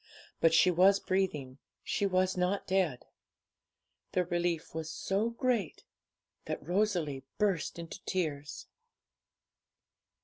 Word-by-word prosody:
But 165 - +5
she 165 +3 +5
was 190 +3 +5
breathing, 150 -9 -1 0.2
she 200 - 0
was 185 0 +1
not 180 +2 0
dead. 185 -9 0 1.1
The 180 -1 +2
relief 175 -1 -1
was 160 0 -4
so 200 +4 0
great 235 - -1 0.6
that - - -5
Rosalie 175 -8 0
burst 195 -7 0
into 170 +3 -8
tears. 150 -6 -3
180 Hz, 105 wpm, -31 LUFS, 160-195 Hz, 1.1 s, But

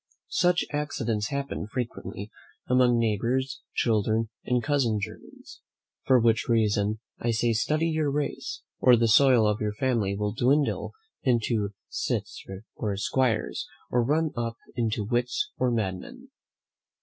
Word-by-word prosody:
Such 180 -1 +2
accidents 120 -8 -1
happen 140 -6 -3
frequently 110 -3 -5 0.4
among 125 -1 +4
neighbours' 115 +4 0
children, 110 0 +1
and 125 -1 0
cousin 135 -6 +1
germans. 100 - -9 0.4
For 130 -1 +5
which 115 0 +2
reason 105 -2 +2 0.2
I 120 - -1
say 115 +1 +2
study 155 +9 +1
your 155 -2 +1
race, 145 +1 -3 0.2
or 125 -1 +7
the 115 0 +3
soil 125 0 +6
of 105 0 0
your 105 -1 -1
family 115 -5 0
will 105 0 -2
dwindle 140 +4 +1 0.3
into 115 -5 0
cits - - -3 0.3
or 105 -4 -2
'squires, 115 +2 0 0.2
or 120 -1 +3
run 155 +5 +1
up 115 -1 -3 0.2
into 115 -2 0
wits 125 - -1
or 130 - +2
madmen. 120 - -3
120 Hz, 130 wpm, -27 LUFS, 110-130 Hz, 0.4 s, or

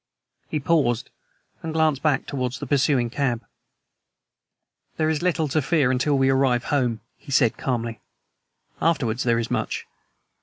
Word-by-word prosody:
He 155 - -1
paused 135 -6 +1 0.5
and 160 -1 -4
glanced 155 -4 +2
back 150 -3 +1
towards 130 -2 -3
the 145 - -6
pursuing 130 -3 +2
cab. 120 -5 -1 1.5
"There 155 0 +2
is 155 - -1
little 175 -3 +1
to 155 +3 +1
fear 145 -3 +2
until 135 +3 +1
we 135 0 +3
arrive 130 -3 +2
home," 125 -6 0 0.2
he - - -12
said 125 -4 +3
calmly. 115 -3 -3 0.8
"Afterwards 130 -8 +1
there 120 -2 +2
is 115 0 -2
much. - - -2
135 Hz, 145 wpm, -24 LUFS, 120-150 Hz, 1.5 s, we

